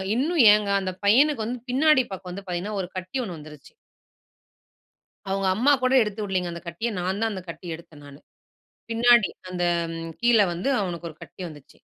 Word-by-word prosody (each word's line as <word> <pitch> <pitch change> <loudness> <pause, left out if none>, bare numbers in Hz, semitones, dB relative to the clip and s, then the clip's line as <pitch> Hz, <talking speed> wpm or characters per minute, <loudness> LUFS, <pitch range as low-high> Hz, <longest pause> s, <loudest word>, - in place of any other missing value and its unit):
இன்னும் 310 +5 +2
ஏங்க 210 -1 +1
அந்த 185 - -3
பையனுக்கு 260 +3 +4
வந்து 245 +2 -3
பின்னாடி 280 +1 +4
பக்கம் 185 -1 -7
வந்து 195 +2 -8
பாத்தீங்கன்னா, 185 +4 -3
ஒரு 180 - -5
கட்டி 185 +7 -5
ஒண்ணு 180 -6 -6
வந்துருச்சு. 150 -2 -13 1.5
அவங்க 195 0 -1
அம்மா 255 +8 +3
கூட 255 +1 +2
எடுத்துவுடலங்க, 195 -4 -2
அந்த 170 - -7
கட்டிய 170 +8 -3
நான் 185 +3 -2
தான் 225 0 +1
அந்த 190 -2 -6
கட்டிய 165 -1 -6
எடுத்தேன் 155 -3 -16
நானு. 140 0 -13 0.7
பின்னாடி 235 -1 +4 0.2
அந்த 180 -1 -3 0.6
கீழ 235 -2 +4
வந்து 180 +10 -2
அவனுக்கு 175 -2 -4
ஒரு 155 - -13
கட்டி - - -12
வந்துச்சு. 150 -4 -14
195 Hz, 165 wpm, -24 LUFS, 175-235 Hz, 1.5 s, பையனுக்கு